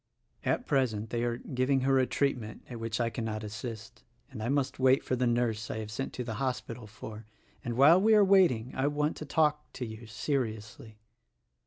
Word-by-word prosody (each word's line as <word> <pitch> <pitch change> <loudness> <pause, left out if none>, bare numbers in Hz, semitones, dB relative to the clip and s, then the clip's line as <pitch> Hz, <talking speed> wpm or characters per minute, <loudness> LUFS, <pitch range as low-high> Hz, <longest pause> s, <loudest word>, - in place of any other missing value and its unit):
At 250 - 0
present 115 -6 0
they 120 0 -1
are 120 -1 -1
giving 130 +2 0
her 135 0 +3
a 130 - +2
treatment 125 -6 -1
at 120 -2 -7
which 115 0 -3
I 115 -1 0
cannot 110 -2 -4
assist, 110 +1 -7 0.3
and 120 -5 -7
I 115 - -2
must 140 -2 0
wait 130 +1 +4
for 130 - -1
the 125 0 +1
nurse 115 -2 0
I - - -3
have 110 -1 -5
sent 135 +5 -4
to 125 - -4
the 115 -2 -4
hospital 125 -3 -3
for; 110 0 -10 0.4
and 120 0 -3
while 160 +7 +7
we 220 +2 +5
are 210 -1 +6
waiting 175 - +4
I 135 +2 +1
want 150 +1 0
to 155 - -6
talk 150 0 +1
to 125 - -4
you, 110 0 -9
seriously. 110 -3 -4
120 Hz, 200 wpm, -30 LUFS, 110-135 Hz, 0.4 s, while